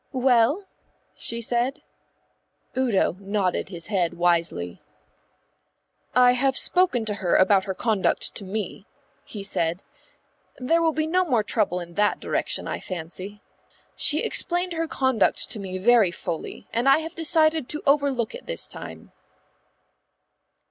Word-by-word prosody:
"Well?" 260 - +2 0.5
she 230 0 -2
said. 240 +3 -1 0.9
Udo 235 -8 +1
nodded 195 -2 -1
his 170 -3 -1
head 185 -5 -1
wisely. 170 - 0 1.3
"I 250 0 +6
have 265 +2 +1
spoken 355 -11 +2
to 210 - -1
her 190 -3 0
about 190 0 +4
her 190 -2 -4
conduct 215 -3 0
to 205 - -5
me," 205 +2 -5 0.4
he 205 -3 -7
said. 175 -2 -1 0.7
"There 330 +7 +1
will 325 -1 +3
be 310 +1 -1
no 365 +4 +2
more 250 -11 +1
trouble 205 -4 0
in 170 -1 -9
that 205 +3 +1
direction, - - -2
I - - -3
fancy. 185 +4 -7 0.5
She 305 - +4
explained 355 +1 +1
her 330 0 -2
conduct 260 -8 +1
to 215 - 0
me 190 -2 -5
very 220 0 +4
fully, 175 +2 -6
and 240 +4 +2
I 275 - +6
have 320 +1 -5
decided 315 -3 +2
to 300 - -3
overlook 275 -5 +1
it - - -10
this - - -2
time." - - -9
230 Hz, 140 wpm, -24 LUFS, 190-280 Hz, 1.3 s, I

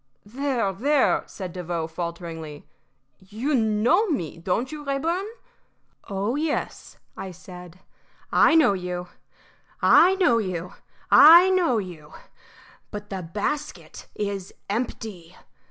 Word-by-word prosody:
"There, 245 -3 -2
there!" 275 +8 +2
said 185 -4 -8
Devoe, 175 -2 -3
falteringly. 165 -2 -7 0.5
"You 215 +10 -4
know 225 - +2
me, 175 - -3
don't 195 - -2
you, 300 -1 -7
Rayburn?" 325 +8 -2 0.8
"Oh 200 +4 -2
yes," 305 0 -3 0.2
I 190 0 -7
said, 180 0 -12 0.5
"I 325 - +5
know 315 -10 +5
you. 180 -1 -5 0.7
I 375 +2 +6
know 355 - +3
you. 180 -4 -4 0.4
I 340 +5 +9
know 350 -10 +2
you. 175 -7 -7 0.8
But 205 -1 -8
the 190 -1 -4
basket 210 - -5
is 200 -2 -4 0.2
empty. 205 -6 -5
205 Hz, 110 wpm, -24 LUFS, 180-275 Hz, 0.8 s, I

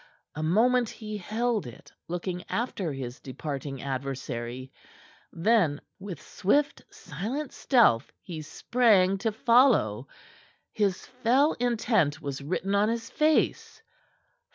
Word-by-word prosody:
A 155 - -5
moment 230 +8 +3
he 215 -2 -7
held 220 - -1
it, 120 - -13 0.2
looking 180 +1 -4
after 210 -8 -2
his 130 -2 -6
departing 135 0 -6
adversary; 130 -2 -4 0.6
then 170 -5 +2 0.2
with 190 -5 -7
swift, 280 +9 0
silent 225 - -5
stealth 235 - +3
he 165 -3 -6
sprang 195 +2 +2
to 225 +2 0
follow. 220 - +3 0.7
His 200 -3 0
fell 255 +4 +2
intent 220 - +1
was 140 -3 -5
written 185 +6 -2
on 205 +2 +3
his 230 0 -3
face. 310 0 +1
195 Hz, 110 wpm, -27 LUFS, 145-235 Hz, 0.7 s, moment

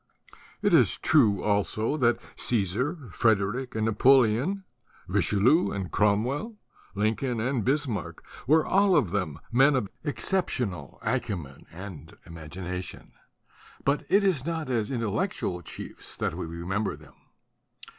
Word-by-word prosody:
It - - +3
is - - +5
true 110 -11 +3
also 105 +4 0
that 120 -4 +2 0.2
Caesar, 125 - -1
Frederick 110 +5 +1
and 110 0 0
Napoleon, 130 - +3 0.4
Richelieu 125 - +3
and 95 -3 -4
Cromwell, 125 - +1 0.4
Lincoln 110 +4 0
and 120 0 0
Bismarck 135 -4 -2 0.2
were 155 +3 +4
all 195 -1 +4
of 120 - +2
them 80 -8 -2
men 135 +4 +5
of 105 -7 -1
exceptional 125 - -2
acumen 100 - -3
and 85 -3 -10
imagination; 90 +3 -7 0.7
but 140 +1 +1
it 200 +1 +4
is 180 -10 +1
not 160 -4 -3
as 110 -4 0
intellectual 115 - -2
chiefs - - -10
that - - -1
we - - -5
remember 90 +6 -2
them. - - -17
115 Hz, 120 wpm, -27 LUFS, 100-140 Hz, 0.7 s, is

